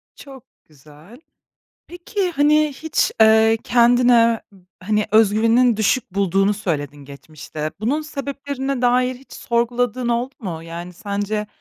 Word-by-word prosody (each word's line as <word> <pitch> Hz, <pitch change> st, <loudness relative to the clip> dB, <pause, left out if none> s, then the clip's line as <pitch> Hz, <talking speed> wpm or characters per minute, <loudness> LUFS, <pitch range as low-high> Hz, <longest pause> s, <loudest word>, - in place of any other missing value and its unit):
Çok 270 Hz, -4 st, -13 dB, 0.2 s
güzel. 155 Hz, -, -18 dB, 0.7 s
Peki, 360 Hz, +2 st, -4 dB
hani, 300 Hz, -1 st, +2 dB
hiç, 315 Hz, +3 st, -1 dB
eee, 220 Hz, 0 st, +5 dB
kendine 240 Hz, -1 st, +4 dB
b 190 Hz, -2 st, -20 dB, 0.2 s
hani 210 Hz, +2 st, 0 dB
öz 215 Hz, -2 st, +5 dB
güveninin 230 Hz, +1 st, +3 dB
düşük 220 Hz, +3 st, 0 dB
bulduğunu 195 Hz, +1 st, +1 dB
söyledin 150 Hz, -8 st, -4 dB
geçmişte. 150 Hz, +2 st, -8 dB
Bunun 275 Hz, +8 st, -1 dB
sebeplerine 275 Hz, -2 st, -5 dB
dair 250 Hz, +1 st, +2 dB
hiç 265 Hz, +2 st, -19 dB
sorguladığın 240 Hz, +1 st, -1 dB
oldu 240 Hz, +3 st, -2 dB
mu? 165 Hz, -6 st, -6 dB
Yani 170 Hz, +2 st, -8 dB
sence 205 Hz, +3 st, -4 dB
230 Hz, 125 wpm, -20 LUFS, 195-255 Hz, 0.7 s, eee